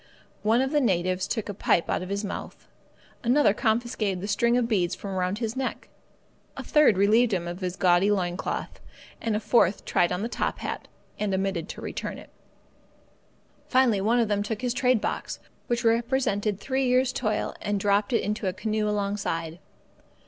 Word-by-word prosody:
One 225 +4 +3
of 265 +1 0
the 295 -1 +3
natives 185 -4 +1
took 220 -3 -2
the 205 - -5
pipe 175 -3 +1
out - - -1
of 185 - -6
his 200 +1 -2
mouth. 200 - -7 0.6
Another 245 -2 +4
confiscated 220 -4 0
the 200 - -5
strings 235 +4 +2
of 245 -2 +1
beads 185 -6 +1
from 200 - -7
around 185 +1 -1
his 225 0 -3
neck. 265 0 -4 0.7
A - - -5
third 300 -10 +4
relieved 220 +3 +4
him 175 -2 -1
of 175 +1 -5
his 180 -2 -3
gaudy 180 +1 +3
loin 180 -4 0
cloth, - - -4 0.4
and 225 -2 0
a - - +1
fourth 210 -4 +2
tried 175 - +2
on 180 +3 -2
the - - -1
top - - -2
hat - - -5 0.3
and 210 -1 0
omitted 190 -3 -2
to - - -7
return - - -5
it. - - -13 1.4
Finally, 250 -6 +3
one 230 +5 +2
of 230 - +2
them 205 -1 0
took 215 +3 -4
his 245 -1 0
trade 250 -3 +2
box, - - -3 0.3
which 240 +1 -1
represented 225 -4 +1
three 265 +3 -1
years' 255 +1 +2
toil, 215 -3 -1
and 205 -1 -1
dropped 205 +2 +1
it 230 - +2
into 210 0 -2
a 185 - 0
canoe 215 +2 -1
alongside. 200 -5 -2
210 Hz, 185 wpm, -26 LUFS, 190-235 Hz, 1.4 s, Another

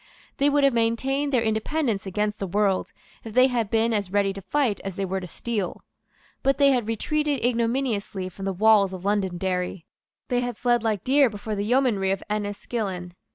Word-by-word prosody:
They 280 +1 +3
would 290 0 +2
have 275 -2 +4
maintained 265 +5 0
their 250 -4 +2
independence 220 -1 -1
against 210 +2 -1
the 195 - -3
world, 195 0 +1 0.3
if 220 -2 -9
they 255 0 +7
had 240 -5 0
been 225 +1 +2
as 200 -4 -1
ready 200 -1 +2
to 195 - -8
fight 230 +2 0
as 195 -2 -5
they 195 - -2
were 190 +1 -2
to 180 - -7
steal. 205 +1 -4 0.6
But 275 0 +2
they 280 -1 +5
had 245 -5 0
retreated 290 +4 -1
ignominiously 230 -5 -1
from 195 +2 -8
the 195 - 0
walls 200 0 +4
of 185 0 -7
Londonderry. 185 -3 -1 0.4
They 245 - +2
had 245 -2 -3
fled 240 -1 +2
like 215 -4 -1
deer 275 0 +4
before 215 +1 -5
the 205 0 -2
yeomanry 235 -5 +2
of 195 0 -1
Enniskillen. 205 -3 -3
215 Hz, 190 wpm, -25 LUFS, 195-245 Hz, 0.6 s, they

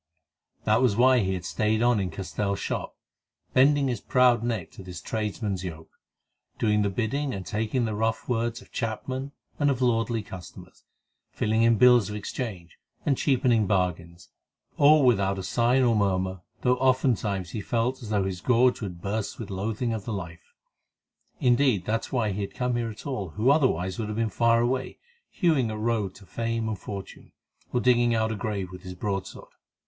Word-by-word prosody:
That 110 +3 +3
was 125 -6 +3
why 130 +2 +5
he 95 -3 0
had 90 -2 -6
stayed 110 +3 0
on 120 -2 +3
in 95 -2 -1
Castell's 100 +3 -3
shop, - - -4 0.6
bending 140 +1 +4
his 120 -5 -2
proud 125 -2 +4
neck 115 -7 -2
to - - -11
this 90 -2 -8
tradesman's 105 -3 -3
yoke, 80 -3 -7 0.7
doing 105 -1 +2
the 100 - +1
bidding 125 +7 -2
and 95 -1 -6
taking 110 +5 -1
the 110 - -2
rough 110 +1 -1
words 120 0 -1
of - - -23
chapmen 130 +4 -3 0.3
and 145 -1 +3
of 135 -3 0
lordly 115 -2 +1
customers, 90 -4 -11 0.4
filling 110 +1 0
in 115 -1 +4
bills 125 -3 +6
of 105 - -5
exchange, 100 -5 -6 0.3
and 140 - +3
cheapening 125 -6 +2
bargains, 90 -3 -2 0.5
all 150 0 +6
without 100 -5 +3
a 95 - -4
sign 120 +7 +2
or 120 -2 +3
murmur, 95 -2 0 0.2
though 125 0 +2
oftentimes 120 -8 +1
he 105 - -4
felt 120 +5 -1
as 115 - -8
though 105 -2 +1
his 95 -2 -4
gorge 125 +2 +3
would 90 -5 -6
burst 105 +1 -3
with 110 -4 -7
loathing 110 +5 -2
of 110 -3 -5
the 115 - -3
life. 85 -4 -8 0.8
Indeed, 120 -6 +3
that 115 +1 -1
was - - -14
why 115 -5 +1
he 100 +2 -3
had 100 - -5
come 125 0 -1
there 120 -1 -1
at 110 - -10
all, 125 - -3
who 110 - +2
otherwise 95 - +1
would 110 - -2
have 105 0 -4
been 115 -1 +1
far 115 +1 +3
away, 130 +2 -1 0.3
hewing 155 - +1
a 110 - -4
road 110 -4 -1
to 100 - -15
fame 115 +1 -2
and 110 -3 -3
fortune, 100 0 -8 0.4
or 125 - +1
digging 120 -1 +3
out 110 0 +1
a - - -2
grave 100 -3 -3
with 90 0 -10
his 90 0 -8
broadsword. 95 0 -4
110 Hz, 185 wpm, -26 LUFS, 100-125 Hz, 0.8 s, bills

